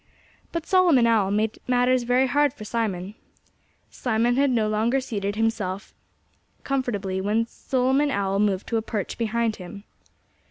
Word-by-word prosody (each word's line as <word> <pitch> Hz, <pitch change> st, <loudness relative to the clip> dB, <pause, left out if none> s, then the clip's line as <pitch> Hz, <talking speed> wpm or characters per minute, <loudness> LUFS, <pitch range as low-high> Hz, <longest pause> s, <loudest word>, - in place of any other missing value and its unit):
But 335 Hz, -1 st, -3 dB
Solomon 345 Hz, -11 st, +4 dB
Owl 220 Hz, -4 st, +3 dB
made 215 Hz, +2 st, -1 dB
matters 250 Hz, 0 st, +3 dB
very 255 Hz, +2 st, +4 dB
hard 285 Hz, +1 st, +2 dB
for 215 Hz, -, -9 dB
Simon. 205 Hz, -4 st, -2 dB, 0.8 s
Simon 240 Hz, 0 st, 0 dB
had 280 Hz, +1 st, +3 dB
no 225 Hz, -4 st, +1 dB
sooner 225 Hz, +5 st, +1 dB
seated 205 Hz, -5 st, -3 dB
himself 215 Hz, -3 st, -2 dB, 0.7 s
comfortably 205 Hz, -9 st, -2 dB
when 215 Hz, +4 st, +1 dB
Solomon 265 Hz, +4 st, 0 dB
Owl 195 Hz, -4 st, 0 dB
moved 200 Hz, -2 st, +1 dB
to 230 Hz, -, +1 dB
a -, -, 0 dB
perch 215 Hz, -4 st, -4 dB
behind 230 Hz, 0 st, 0 dB
him. 195 Hz, +2 st, -10 dB
225 Hz, 145 wpm, -24 LUFS, 205-255 Hz, 0.8 s, Solomon